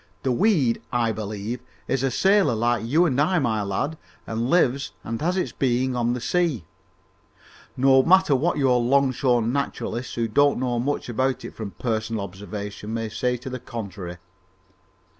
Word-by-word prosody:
The 130 Hz, -, +1 dB
weed, 140 Hz, -, +2 dB
I 120 Hz, -2 st, +1 dB
believe, 110 Hz, +2 st, -4 dB, 0.3 s
is 135 Hz, 0 st, 0 dB
a 135 Hz, -, +1 dB
sailor, 195 Hz, -, +3 dB
like 120 Hz, 0 st, +1 dB
you 155 Hz, +10 st, +3 dB
and 140 Hz, -4 st, +1 dB
I, 180 Hz, +5 st, +2 dB
my 110 Hz, -8 st, +1 dB
lad, 105 Hz, +11 st, -2 dB, 0.3 s
and 115 Hz, +2 st, -2 dB
lives 140 Hz, -5 st, +2 dB
and 115 Hz, 0 st, -4 dB
has 180 Hz, +4 st, 0 dB
its 185 Hz, -, -1 dB
being 130 Hz, 0 st, 0 dB
on 120 Hz, 0 st, +1 dB
the 125 Hz, -, -3 dB
sea, 160 Hz, -, 0 dB, 1.1 s
no 135 Hz, +1 st, +5 dB
matter 185 Hz, 0 st, +4 dB
what 155 Hz, +6 st, +1 dB
your 130 Hz, -3 st, +3 dB
longshore 130 Hz, -1 st, +2 dB
naturalists, 125 Hz, 0 st, -3 dB
who 115 Hz, -1 st, 0 dB
don't 145 Hz, +5 st, +3 dB
know 125 Hz, -2 st, -1 dB
much 140 Hz, +4 st, -2 dB
about 130 Hz, +1 st, -1 dB
it -, -, -8 dB
from 110 Hz, -2 st, -6 dB
personal 110 Hz, -2 st, -2 dB
observation, 100 Hz, +3 st, -6 dB
may 115 Hz, -1 st, -3 dB
say 125 Hz, +3 st, -1 dB
to 125 Hz, +2 st, -8 dB
the 130 Hz, -, -4 dB
contrary. 100 Hz, -7 st, -7 dB
125 Hz, 165 wpm, -24 LUFS, 115-140 Hz, 1.1 s, no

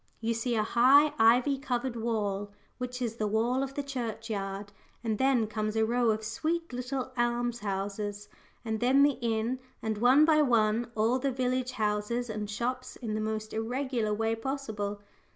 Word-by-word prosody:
You 230 Hz, 0 st, 0 dB
see 230 Hz, +1 st, -1 dB
a 215 Hz, -, +2 dB
high, 265 Hz, +7 st, +5 dB
ivy 245 Hz, +5 st, +4 dB
covered 250 Hz, -2 st, -2 dB
wall, 205 Hz, -3 st, -2 dB, 0.3 s
which 250 Hz, 0 st, -4 dB
is 230 Hz, -1 st, -3 dB
the 215 Hz, -, 0 dB
wall 230 Hz, +5 st, +1 dB
of 275 Hz, 0 st, -4 dB
the 285 Hz, -, -2 dB
church 235 Hz, -4 st, -4 dB
yard, 195 Hz, 0 st, -4 dB, 0.3 s
and 220 Hz, -2 st, -1 dB
then 260 Hz, -4 st, +3 dB
comes 215 Hz, 0 st, -3 dB
a 220 Hz, 0 st, +3 dB
row 240 Hz, +1 st, +2 dB
of 220 Hz, 0 st, 0 dB
sweet 320 Hz, +8 st, -2 dB
little 255 Hz, +1 st, -3 dB
alms 240 Hz, 0 st, 0 dB
houses, 205 Hz, 0 st, -3 dB, 0.4 s
and 220 Hz, -1 st, -2 dB
then 260 Hz, +4 st, +5 dB
the 285 Hz, -2 st, +3 dB
inn, 230 Hz, +2 st, 0 dB, 0.2 s
and 220 Hz, -1 st, -3 dB
one 260 Hz, +6 st, +6 dB
by 310 Hz, -1 st, +5 dB
one 230 Hz, -3 st, +2 dB
all 225 Hz, +4 st, +2 dB
the 275 Hz, +2 st, 0 dB
village 255 Hz, 0 st, -1 dB
houses 220 Hz, +2 st, -1 dB
and 210 Hz, -1 st, -4 dB
shops 250 Hz, +4 st, -3 dB
in 225 Hz, -4 st, -5 dB
the 215 Hz, -, -1 dB
most 215 Hz, 0 st, -3 dB
irregular 235 Hz, 0 st, -1 dB
way 225 Hz, +2 st, 0 dB
possible. 220 Hz, -5 st, -4 dB
230 Hz, 175 wpm, -29 LUFS, 215-255 Hz, 0.4 s, one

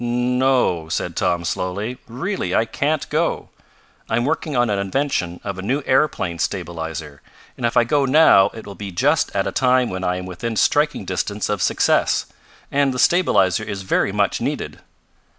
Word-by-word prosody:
"No," 125 Hz, -8 st, +1 dB
said -, -, -3 dB
Tom, 85 Hz, -1 st, 0 dB
slowly. 95 Hz, +9 st, -3 dB
"Really 130 Hz, -, -3 dB
I 115 Hz, -, +3 dB
can't 150 Hz, +6 st, -1 dB
go. 165 Hz, +3 st, -1 dB, 0.6 s
I'm 120 Hz, +2 st, +1 dB
working 155 Hz, 0 st, -2 dB
on 120 Hz, -3 st, +2 dB
an 100 Hz, -, 0 dB
invention 100 Hz, -5 st, -1 dB
of 100 Hz, -2 st, -5 dB
a -, -, -3 dB
new 130 Hz, +9 st, -1 dB
aeroplane 130 Hz, -, +1 dB
stabilizer, 80 Hz, -5 st, -4 dB, 0.3 s
and 120 Hz, -, -1 dB
if 115 Hz, -, -2 dB
I -, -, +6 dB
go 140 Hz, +4 st, +1 dB
now 135 Hz, -8 st, +6 dB
it 110 Hz, -, -9 dB
will 100 Hz, -, -8 dB
be 100 Hz, 0 st, -7 dB
just 145 Hz, -, +2 dB
at 95 Hz, -, +1 dB
a -, -, -2 dB
time 125 Hz, -1 st, +2 dB
when 95 Hz, 0 st, -4 dB
I 90 Hz, 0 st, 0 dB
am 90 Hz, 0 st, -5 dB
within 110 Hz, +6 st, -5 dB
striking 150 Hz, +8 st, +1 dB
distance 105 Hz, 0 st, -2 dB
of 105 Hz, -3 st, -1 dB
success. -, -, +2 dB, 0.5 s
And 140 Hz, -2 st, +1 dB
the -, -, -3 dB
stabilizer 115 Hz, -, +3 dB
is 100 Hz, -2 st, -5 dB
very 95 Hz, -, +1 dB
much -, -, 0 dB
needed." -, -, -3 dB
115 Hz, 175 wpm, -21 LUFS, 90-135 Hz, 0.6 s, I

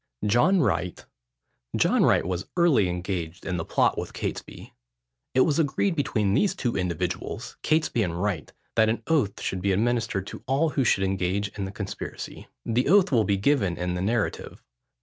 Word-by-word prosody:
JOHN 120 Hz, -, +4 dB
WRIGHT. 95 Hz, -, -1 dB, 0.7 s
John -, -, +3 dB
Wright -, -, +3 dB
was 90 Hz, 0 st, -3 dB
early 150 Hz, -, +4 dB
engaged 90 Hz, -1 st, -4 dB
in 90 Hz, -2 st, -2 dB
the 85 Hz, -, -2 dB
plot -, -, +1 dB
with -, -, -6 dB
Catesby. -, -, -6 dB, 0.6 s
It 130 Hz, -, +5 dB
was 150 Hz, +3 st, +3 dB
agreed 165 Hz, +5 st, +1 dB
between 105 Hz, -9 st, 0 dB
these 195 Hz, -, +2 dB
two 120 Hz, -10 st, -2 dB
individuals, 90 Hz, -3 st, -3 dB
Catesby 155 Hz, -6 st, +1 dB
and 85 Hz, -4 st, -2 dB
Wright, 90 Hz, -6 st, -2 dB, 0.2 s
that 110 Hz, -1 st, +4 dB
an 115 Hz, -, -2 dB
oath 140 Hz, -12 st, +1 dB
should 95 Hz, -, -2 dB
be 100 Hz, +1 st, +1 dB
administered 110 Hz, -1 st, 0 dB
to -, -, -9 dB
all 140 Hz, +5 st, +2 dB
who 140 Hz, -2 st, 0 dB
should 100 Hz, -5 st, +2 dB
engage 95 Hz, +1 st, 0 dB
in 100 Hz, 0 st, -5 dB
the 95 Hz, -, -6 dB
conspiracy. 100 Hz, 0 st, -7 dB, 0.2 s
The 120 Hz, +3 st, +1 dB
oath 195 Hz, -1 st, +5 dB
will 115 Hz, -5 st, +3 dB
be 100 Hz, -1 st, +1 dB
given 100 Hz, -5 st, +1 dB
in 90 Hz, 0 st, -2 dB
the 90 Hz, -, -3 dB
narrative. 110 Hz, +2 st, -2 dB
105 Hz, 175 wpm, -26 LUFS, 95-135 Hz, 0.7 s, It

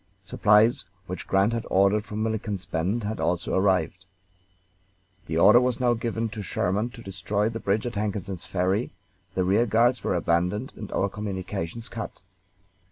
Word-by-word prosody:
Supplies 105 Hz, +1 st, +3 dB, 0.2 s
which 90 Hz, 0 st, -6 dB
Grant 100 Hz, +4 st, +3 dB
had 115 Hz, -, -2 dB
ordered 100 Hz, +2 st, +3 dB
from 105 Hz, 0 st, -3 dB
Milliken's 110 Hz, -3 st, -3 dB
Bend 95 Hz, +8 st, -1 dB
had 110 Hz, +2 st, -3 dB
also 90 Hz, 0 st, -1 dB
arrived. 95 Hz, -1 st, +1 dB, 1.2 s
The 80 Hz, -, -2 dB
order 120 Hz, +8 st, +7 dB
was 125 Hz, -1 st, 0 dB
now 125 Hz, -1 st, +3 dB
given 115 Hz, 0 st, -2 dB
to 110 Hz, 0 st, -6 dB
Sherman 100 Hz, +3 st, -1 dB
to 115 Hz, -, -11 dB
destroy 100 Hz, +2 st, -1 dB
the 115 Hz, 0 st, -5 dB
bridge 105 Hz, +2 st, 0 dB
at 120 Hz, -, -3 dB
Hankinson's 100 Hz, -3 st, -3 dB
Ferry, 95 Hz, +5 st, -1 dB, 0.4 s
the 95 Hz, -, +1 dB
rear 100 Hz, +6 st, +3 dB
guards 120 Hz, +3 st, +3 dB
were -, -, 0 dB
abandoned, 90 Hz, +8 st, 0 dB
and 105 Hz, -, -8 dB
our 100 Hz, -, +1 dB
communications 100 Hz, +1 st, -4 dB
cut. 115 Hz, -2 st, -6 dB
105 Hz, 160 wpm, -26 LUFS, 95-115 Hz, 1.2 s, order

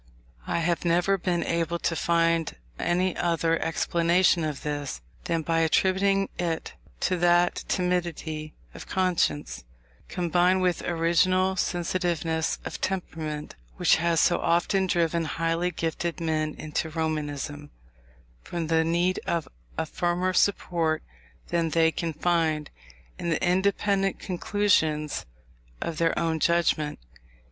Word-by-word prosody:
I 170 Hz, -, 0 dB
have 170 Hz, 0 st, 0 dB
never 175 Hz, +3 st, +3 dB
been 175 Hz, -1 st, 0 dB
able 170 Hz, 0 st, -1 dB
to 170 Hz, -, -1 dB
find 165 Hz, -1 st, +1 dB, 0.2 s
any 180 Hz, +1 st, +1 dB
other 165 Hz, -1 st, +1 dB
explanation 170 Hz, +2 st, +2 dB
of 150 Hz, -3 st, -3 dB
this, 145 Hz, -, -3 dB, 0.3 s
than 165 Hz, -1 st, 0 dB
by 165 Hz, +1 st, +1 dB
attributing 190 Hz, +4 st, +2 dB
it 165 Hz, -2 st, -2 dB, 0.3 s
to 185 Hz, -, +1 dB
that 175 Hz, 0 st, +3 dB
timidity 170 Hz, -4 st, -2 dB, 0.2 s
of -, -, -10 dB
conscience, 75 Hz, -, 0 dB, 0.4 s
combined 180 Hz, +1 st, +2 dB
with 180 Hz, -2 st, +1 dB
original 180 Hz, +3 st, +2 dB
sensitiveness 170 Hz, -3 st, -1 dB
of -, -, -6 dB
temperament, 160 Hz, -5 st, -3 dB, 0.2 s
which -, -, +4 dB
has 170 Hz, -1 st, +1 dB
so 175 Hz, -, +3 dB
often 190 Hz, +3 st, +2 dB
driven 170 Hz, -1 st, +1 dB
highly 165 Hz, +2 st, 0 dB
gifted 165 Hz, 0 st, -3 dB
men 155 Hz, -2 st, -1 dB
into 155 Hz, +1 st, -3 dB
Romanism, 150 Hz, -2 st, -3 dB, 0.7 s
from 170 Hz, -, -4 dB
the 160 Hz, 0 st, +3 dB
need 170 Hz, +3 st, +1 dB
of 170 Hz, -3 st, -1 dB, 0.3 s
a -, -, 0 dB
firmer 175 Hz, +3 st, -1 dB
support 170 Hz, -4 st, +1 dB, 0.5 s
than 170 Hz, -1 st, +1 dB
they 160 Hz, 0 st, +3 dB
can 165 Hz, 0 st, -3 dB
find 160 Hz, -2 st, 0 dB, 0.5 s
in 170 Hz, -, -2 dB
the 165 Hz, +1 st, 0 dB
independent 195 Hz, +1 st, +1 dB
conclusions 170 Hz, -, 0 dB, 0.5 s
of 160 Hz, -2 st, -4 dB
their 165 Hz, 0 st, +2 dB
own 165 Hz, -1 st, 0 dB
judgment. 165 Hz, -3 st, +1 dB
170 Hz, 120 wpm, -26 LUFS, 160-180 Hz, 0.7 s, which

